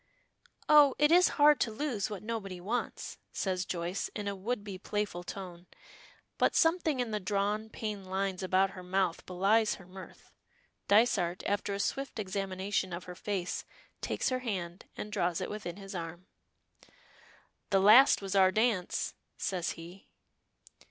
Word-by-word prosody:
"Oh! 295 -3 +7
it 295 +1 +4
is 360 +1 +7
hard 295 0 +6
to 230 - +1
lose 220 -4 -2
what 205 -2 -6
nobody 210 -5 -4
wants," 220 +7 -4
says 185 -1 -1
Joyce 175 +2 -2
in 205 -1 -4
a 200 - -2
would 210 +3 -3
be 195 -3 -7
playful 205 -3 -3
tone, 180 -2 -8 0.7
but - - +3
something 325 -4 +2
in 245 -2 -1
the 210 - -1
drawn, 205 +2 -1
pained 210 -4 -5
lines 190 0 -2
about 190 +1 +2
her 185 - -9
mouth 180 -1 0
belies 200 +4 +2
her 190 - -14
mirth. 185 +1 -12 0.6
Dysart, 200 -5 +3
after 200 0 -1
a - - -5
swift 275 +5 -2
examination 195 -1 -2
of 175 +1 -5
her 180 - -8
face, 180 0 -3 0.4
takes - - -1
her 255 -1 -1
hand 185 -7 -4
and 210 - -6
draws 175 -5 0
it - - -4
within 200 -4 -6
his 195 -1 -9
arm. 170 0 -6 1.4
"The 195 - +4
last 215 +4 +7
was 195 - -3
our 190 -1 +6
dance," 215 -3 0 0.2
says 180 -3 -2
he. 175 +4 -12
195 Hz, 155 wpm, -31 LUFS, 185-220 Hz, 1.4 s, Oh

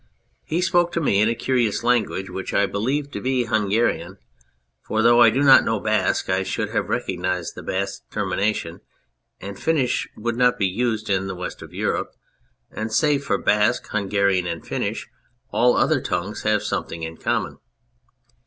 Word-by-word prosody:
He 165 +3 -1
spoke 175 -1 +2
to - - 0
me 105 -10 +2
in 110 - +3
a 115 - 0
curious 120 -4 0
language 120 -5 +1
which 95 - -5
I 100 - +4
believed 135 +9 -2
to - - -4
be 130 -1 +1
Hungarian 110 0 0 0.6
for 110 0 -1
though 120 +1 +6
I 115 - +8
do 130 +6 0
not 135 -2 +8
know 115 - 0
Basque 105 -3 0
I 95 0 +1
should 95 - -2
have - - -1
recognised 90 -1 -2
the - - -9
Basque 100 +1 -3
terminations, 100 -3 -2 0.6
and 100 0 -8
Finnish 145 -6 0
would 115 +1 -3
not 125 -1 +3
be 100 - +1
used 110 +3 -1
in 95 -1 0
the 95 - -4
West 90 0 -6
of - - -10
Europe, - - -2 0.6
and 110 +1 -4
save 145 +3 +2
for - - 0
Basque, 105 +3 +2
Hungarian, 100 -3 +1
and 85 -1 -5
Finnish - - -3 0.4
all 125 +1 +3
other 155 -3 +2
tongues 95 +3 -3
have 105 -1 +1
something 85 - -3
in 80 0 -6
common. - - -2
110 Hz, 170 wpm, -22 LUFS, 95-125 Hz, 0.6 s, I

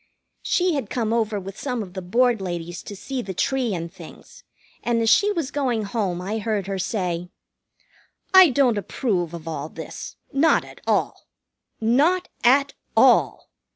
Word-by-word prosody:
She 360 -1 +1
had 270 -8 -3
come 225 -3 -1
over 220 -3 0
with 195 0 -9
some 250 -5 -2
of 180 -3 -12
the 190 - -5
Board 235 +4 +2
ladies 175 -1 -5
to 205 - -9
see 260 +6 -4
the 190 -4 -6
tree 255 -2 0
and 170 0 -6
things, 175 -4 -13 0.4
and 235 -1 0
as 225 -1 +3
she 410 +1 +4
was 330 -9 -2
going 250 -6 0
home 200 -4 -2
I 210 +4 -3
heard 210 -2 -1
her 195 -1 -3
say: 180 -3 -2 1.0
"I 375 -3 +9
don't 250 -5 +2
approve 185 - -2
of 170 -2 -9
all 160 - -4
this. - - -8 0.2
Not 295 +4 +3
at - - -14
all. - - 0 0.5
Not 295 +11 +2
at 275 +3 +4 0.2
all. - - +4
220 Hz, 165 wpm, -23 LUFS, 185-260 Hz, 1.0 s, I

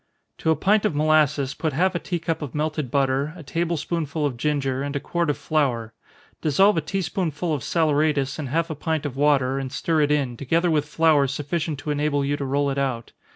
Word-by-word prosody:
_ - - -51
To - - 0
a 160 - +4
pint 200 +7 +2
of 210 -8 0
molasses 150 -2 +2
put 155 -1 -2
half 185 +6 +2
a 175 - -1
tea 175 - -3
cup 165 -1 -3
of 150 -2 -6
melted 150 -2 -1
butter, 140 +2 +1
a 165 - -9
table 170 +3 -1
spoonful 155 -1 -2
of 140 -4 -1
ginger, 135 0 -1
and 140 0 -3
a - - 0
quart 170 +3 -1
of 145 - 0
flour. 135 -7 -1 0.5
Dissolve 190 +6 +4
a - - +2
tea 195 +5 -2
spoonful 165 -1 -2
of 145 - -2
saleratus 150 -3 +1
in 145 - -3
half 165 +5 -1
a - - -3
pint 155 0 -2
of 140 -3 -4
water, 135 -2 +2
and 135 -1 -5
stir 155 +3 0
it 145 - +2
in, 140 -5 0
together 165 +7 +1
with 150 -1 0
flour 155 -3 +3
sufficient 150 +3 -2
to 150 - -3
enable 145 -1 0
you 145 +1 0
to 140 - -4
roll 140 +1 +1
it 140 - -2
out. 130 -4 -2
150 Hz, 230 wpm, -24 LUFS, 140-160 Hz, 0.5 s, a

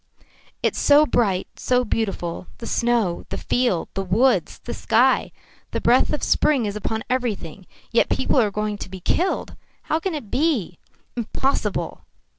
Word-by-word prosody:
"It's - - +1
so 295 +1 +6
bright, 200 -10 +1
so 250 0 +2
beautiful 195 -6 -2
the 230 - -8
snow, 230 -9 0
the - - -3
field, 245 -9 0
the 195 - -2
woods, 225 +8 +2
the - - -7
sky. - - +2 0.4
The - - -2
breath - - +3
of - - -2
spring 270 -7 +2
is 205 0 -3
upon 220 +1 -3
everything. 210 -8 -3 0.2
Yet 235 - +3
people 265 - +2
are 215 - +2
going 210 0 -3
to - - -6
be 190 0 -8
killed. 355 - -1 0.3
How 315 - 0
can 350 0 -2
it 235 -9 -7
be? 260 - 0 0.4
Impossible!" 245 +3 -2
230 Hz, 155 wpm, -23 LUFS, 195-260 Hz, 0.4 s, so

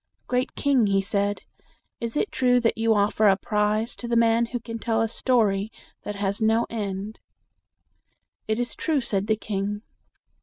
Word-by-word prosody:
"Great 250 +1 -1
king," 270 -6 +2
he 195 -1 +2
said, 200 +1 -1 0.6
"is 230 +3 -3
it 415 - 0
true 250 -1 +3
that 230 -1 +1
you 225 0 +2
offer 210 +1 +3
a 195 -1 +5
prize 210 +3 0
to 240 - -7
the 235 - 0
man 230 0 +3
who 245 +1 -4
can 230 0 -7
tell 225 -1 0
a 225 - +2
story 220 -4 +1 0.3
that 205 - -5
has 200 +1 -2
no 225 +2 +3
end?" 205 -1 -4 1.3
"It 220 +1 0
is 245 -1 -1
true," 305 -4 0
said 205 -4 -1
the 220 - +3
king. 205 0 -3
220 Hz, 175 wpm, -25 LUFS, 205-235 Hz, 1.3 s, a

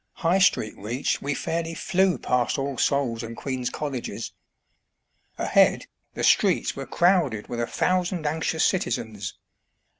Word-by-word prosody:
High 180 +4 +4
Street 145 - +2
reached, 120 +7 -2
we 145 0 -2
fairly 165 +2 -3
flew 185 -3 +1
past 125 +2 0
All 135 0 -2
Souls' 130 -5 +1
and 115 0 -7
Queen's 130 -2 -3
Colleges. 135 -3 -5 1.0
Ahead, - - +3 0.3
the - - -3
streets - - +3
were - - -6
crowded 170 - +2
with 120 - -4
a 120 - -1
thousand 180 -2 0
anxious 160 +2 +1
citi 185 -10 0
zens. 105 -4 -6
140 Hz, 140 wpm, -25 LUFS, 120-170 Hz, 1.0 s, High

